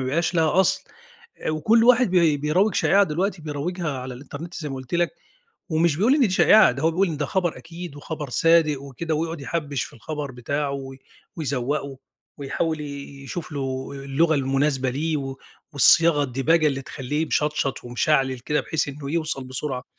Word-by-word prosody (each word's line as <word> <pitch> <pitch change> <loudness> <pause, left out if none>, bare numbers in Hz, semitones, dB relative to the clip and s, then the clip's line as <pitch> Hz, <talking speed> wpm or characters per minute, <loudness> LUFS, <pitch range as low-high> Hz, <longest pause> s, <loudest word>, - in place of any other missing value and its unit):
يبقاش 150 +7 0
ليها 165 +2 +3
أصل، 190 - +1 0.6
وكل 215 +9 +3
واحد 250 -3 +5
بي 170 -5 +4
بيروّج 170 +9 +1
شائعة 200 +1 +4
دلوقتي، 180 +1 -2
بيروّجها 160 +3 -3
على 130 0 -6
الإنترنت 145 +6 -9
زي 155 -4 -5
ما 135 - -5
قُلت 130 +3 -6
لك، 175 0 +2 0.6
ومش 160 -1 +2
بيقول 225 - +3
إن 300 - +1
دي 240 -7 +3
شائعة، 215 +3 +6
ده 140 - -6
هو 160 - +3
بيقول 185 +4 +1
إن 160 - -3
ده 145 -1 -2
خبر 180 -3 -1
أكيد 165 -2 -9
وخبر 150 -1 -6
صادق 155 -1 +3
وكده 150 +4 -4
ويقعد 165 +1 -3
يحبّش 145 -2 -3
في - - -12
الخبر 145 +3 -6
بتاعه 140 +4 -3
و 135 -1 -6 0.4
ويزوّقه 140 -2 -2 0.4
ويحاول 155 +3 -2
ي 140 -1 -8
يشوف 165 +4 -6
له 135 -2 -4
اللغة 140 +4 +1
المناسبة 135 -1 +1
ليه، 155 +5 -1
و 135 -2 -5 0.4
والصياغة، 145 - +6
الدِباجة 145 +5 +2
اللي 135 -2 -1
تخلّيه 145 +5 -3
مشطشط 150 -3 -1
ومشعلل 130 +1 +1
كده 150 +5 -1
بحيث 160 -2 -2
إنه 140 0 -6
يوصل 155 -4 -2
بسرعة. 130 0 -4
150 Hz, 170 wpm, -23 LUFS, 135-165 Hz, 0.6 s, شائعة